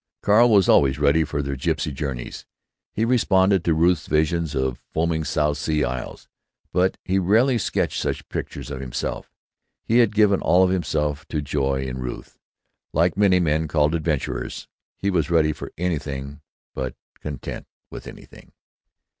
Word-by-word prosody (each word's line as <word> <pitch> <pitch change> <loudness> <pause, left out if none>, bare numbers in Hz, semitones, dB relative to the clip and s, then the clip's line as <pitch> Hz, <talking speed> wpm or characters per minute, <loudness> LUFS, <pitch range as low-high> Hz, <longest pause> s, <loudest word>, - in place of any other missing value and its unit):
Carl 115 +4 +5
was 100 -4 +5
always 70 0 +4
ready 75 +2 +3
for 75 -1 -3
their 70 0 -3
gipsy 80 +3 -1
journeys; 65 -3 -5 0.5
he 110 - 0
responded 95 -6 +3
to 85 -2 +2
Ruth's 85 0 +2
visions 80 0 0
of 65 -2 -1
foaming 80 0 0
South 75 -1 0
Sea 75 -2 0
isles; 65 -2 -5 0.5
but 90 +1 +2
he 95 +1 +1
rarely 115 +7 +3
sketched - - -1
such - - -3
pictures - - -6
himself. 65 -3 -5 0.5
He 115 +2 +3
had 115 -4 +3
given 105 -2 +4
all 90 +1 +4
of 90 - +2
himself 75 -5 -1
to 75 - -2
joy 70 -2 -1
in 65 -1 -5
Ruth. 60 -1 -7 0.5
Like 85 +2 +2
many 95 -2 +4
men 80 -2 +1
called 75 0 +2
"adventurers," 75 -7 -3 0.3
he 100 - -1
was 80 -6 0
ready 80 -2 +3
for - - -8
anything 70 -5 -3 0.3
but 65 -1 -4 0.2
content 70 -4 -7 0.2
with - - -9
anything. - - -14
80 Hz, 155 wpm, -23 LUFS, 70-90 Hz, 0.5 s, Carl